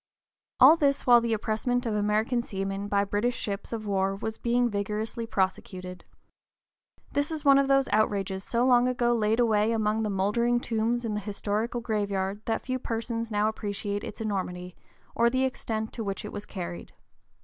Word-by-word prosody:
(p. - - +9
043) - - +11
All 330 - +4
this 280 -3 +1
while 240 -1 +7
the 230 -1 0
impressment 230 +3 -1
of 225 - -1
American 210 +4 +1
seamen 195 -2 -4
by 200 -1 +2
British 205 +5 0
ships 200 -1 -4
of 225 -2 -4
war 195 -1 0
was 220 +2 -5
being 240 +1 +2
vigorously 215 +2 -3
prosecuted. 185 -3 -3 1.1
This 285 +1 0
is 315 -2 -5
one 275 -1 +7
of 275 - +2
those 275 -1 +3
outrages 195 -3 +1
so 235 +3 0
long 250 -1 +5
ago 240 -1 +1
laid 220 0 +1
away 220 -2 +3
among 220 -1 +1
the 215 - -1
mouldering 210 +5 +1
tombs 235 +1 -1
in 220 - -2
the 210 - -1
historical 210 +3 -2
graveyard 205 -3 -2
that 225 - -1
few 255 0 -2
persons 230 -1 -3
now 210 -1 +1
appreciate 205 -1 -3
its - - -7
enormity, 180 -4 -3 0.4
or 235 0 +3
the 260 +2 +1
extent 220 -4 -3
to 230 - -4
which 200 0 -4
it - - -6
was 205 - -6
carried. 175 -2 -7
220 Hz, 180 wpm, -27 LUFS, 200-240 Hz, 1.1 s, 043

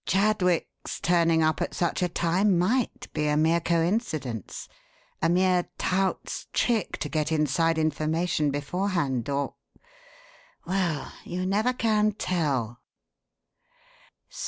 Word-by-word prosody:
Chadwick's 190 -3 0
turning 165 -2 +3
up 155 0 +1
at - - -2
such 175 +2 0
a 180 - +1
time 175 +3 +2
might 245 +6 0
be 150 -1 0
a 150 0 +2
mere 160 +2 +3
coincidence 165 - -1 0.5
a 165 - +3
mere 180 0 +2
tout's 190 +1 -1
trick 230 -6 +1
to - - -3
get 155 +1 -1
inside 160 +2 +2
information 155 0 0
beforehand, 145 - -1
or 140 0 -1 1.1
Well, 175 -5 -1
you 180 +1 -4
never 210 +6 +2
can 215 -4 +1
tell. 135 - -1
170 Hz, 110 wpm, -26 LUFS, 155-190 Hz, 1.1 s, turning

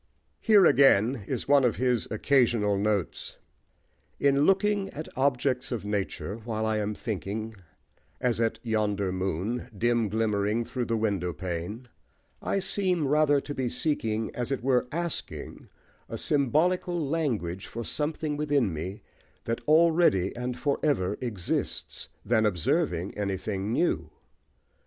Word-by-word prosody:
Here 210 -5 +5
again 125 - +4
is 130 -4 -3
one 140 -1 +5
of 120 -3 +2
his 125 -3 0
occasional 115 -3 +2
notes: 100 -2 -2 0.8
"In 140 +1 +3
looking 195 0 +2
at 155 -2 -7
objects 130 -1 0
of 115 -4 -3
nature 105 0 -3
while 110 -1 -3
I 110 0 +1
am 105 0 -2
thinking, 110 +2 -4 0.7
as 120 -2 0
at 115 -1 +1
yonder 105 -4 0
moon, 95 +7 -2
dim 120 0 +1
glimmering 105 +1 0
through 125 0 -3
the 115 -1 0
window 100 -5 -1
pane, 90 - -5 0.5
I - - -1
seem 185 -5 +1
rather 145 0 +4
to 145 - -6
be 130 -3 -2
seeking, 115 -4 -1
as 120 +1 -3
it 135 -3 -2
were 125 -1 +2
asking, 170 +1 -4 0.4
a - - -4
symbolical 170 +5 +1
language 135 - -2
for 115 - -6
something 150 +3 -2
within 145 - +1
me, 90 +6 -6 0.4
that 115 0 -2
already 160 - +4
and 125 0 -4
for 145 -2 0
ever 105 -11 +1
exists, 105 -8 -3 0.2
than 110 0 +3
observing 90 -1 0
anything 100 0 -2
new. 85 - 0
120 Hz, 135 wpm, -27 LUFS, 105-140 Hz, 0.8 s, Here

